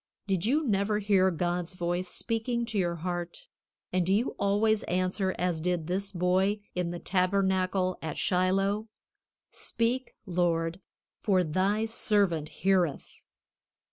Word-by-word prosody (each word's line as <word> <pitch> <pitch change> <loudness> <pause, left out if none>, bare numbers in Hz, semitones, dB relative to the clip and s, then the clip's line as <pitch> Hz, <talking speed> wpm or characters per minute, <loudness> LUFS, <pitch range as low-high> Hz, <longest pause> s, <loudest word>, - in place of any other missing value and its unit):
Did 195 -1 0
you 300 +5 +2
never 205 0 +1
hear 200 -2 +3
God's 175 +1 -2
voice 175 +1 -1
speaking 235 +3 -2
to 220 -2 -4
your 175 -2 0
heart, 175 0 -5 0.5
and 185 -1 +2
do 180 - 0
you 215 +6 +2
always 205 +2 +2
answer 185 +2 0
as 175 -3 -1
did 175 -1 -1
this 195 +4 -1
boy 185 +3 +2 0.2
in 180 -1 -1
the 175 - -4
tabernacle 185 0 +1
at 160 -2 -4
Shiloh: 195 +4 +1 0.6
"Speak, 240 +3 -1
Lord, 170 -2 0 0.4
for 190 -4 +2
thy 190 +7 +1
servant 200 -9 +1
heareth"? 180 -5 +1
185 Hz, 130 wpm, -29 LUFS, 175-205 Hz, 0.6 s, hear